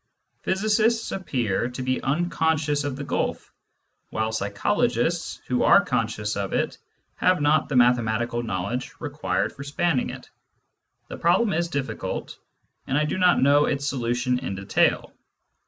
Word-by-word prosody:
Physicists 215 +4 +1
appear 120 - -1
to 125 +1 -6
be 130 0 -1
unconscious 155 -1 0
of 140 -2 -2
the 145 - -5
gulf, - - -3 0.6
while 110 0 -1
psychologists, 100 -2 0
who - - 0
are - - +6
conscious 105 0 -1
of 100 -1 -3
it, - - -1 0.4
have 185 0 +3
not 150 +1 +2
the 140 - -2
mathematical 120 -1 +2
know 95 -6 -3
ledge 125 +6 -4
required - - -2
for 140 - -8
spanning 145 0 0
it. - - -9 0.8
The - - -7
problem 190 +6 +2
is 170 +2 0
difficult, 140 -5 -4 0.5
and 135 - +1
I 150 - +2
do 150 +5 -2
not 180 -6 +4
know 145 +2 +5
its 140 -1 -1
solution 125 -1 0
in 125 -7 -4
detail. 95 +1 +1
135 Hz, 145 wpm, -24 LUFS, 120-160 Hz, 0.8 s, are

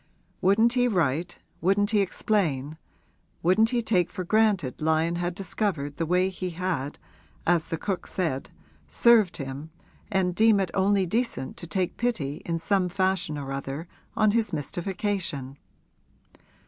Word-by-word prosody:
Wouldn't 220 +5 +4
he 245 -1 +3
write, 175 - 0 0.2
wouldn't 205 +4 +2
he 210 -2 +4
explain, 160 -7 -1 0.6
wouldn't 200 +6 +4
he 240 -1 0
take 180 -6 +2
for 185 - -5
granted 195 - +1
Lyon 160 +2 +1
had 175 0 -2
discovered 175 -7 -2
the 165 - -1
way 180 +2 +2
he 185 -1 -4
had, 165 -5 -3 0.5
as 170 -1 +2
the 165 - -3
cook 190 +2 -3
said, 160 -8 -2 0.4
served 230 -6 +4
him 140 +2 -6 0.4
and 190 -2 +1
deem 220 +1 +4
it 190 -3 -1
only 195 0 +2
decent 225 - -2
to 170 - -8
take 185 +1 -1
pity 155 - -2
in 165 -1 0
some 180 +2 +1
fashion 185 -4 0
or 140 -1 -5
other 135 +4 -5 0.3
on 215 -1 +4
his 225 0 +1
mystification? 170 -3 -3
180 Hz, 145 wpm, -26 LUFS, 160-205 Hz, 0.6 s, Wouldn't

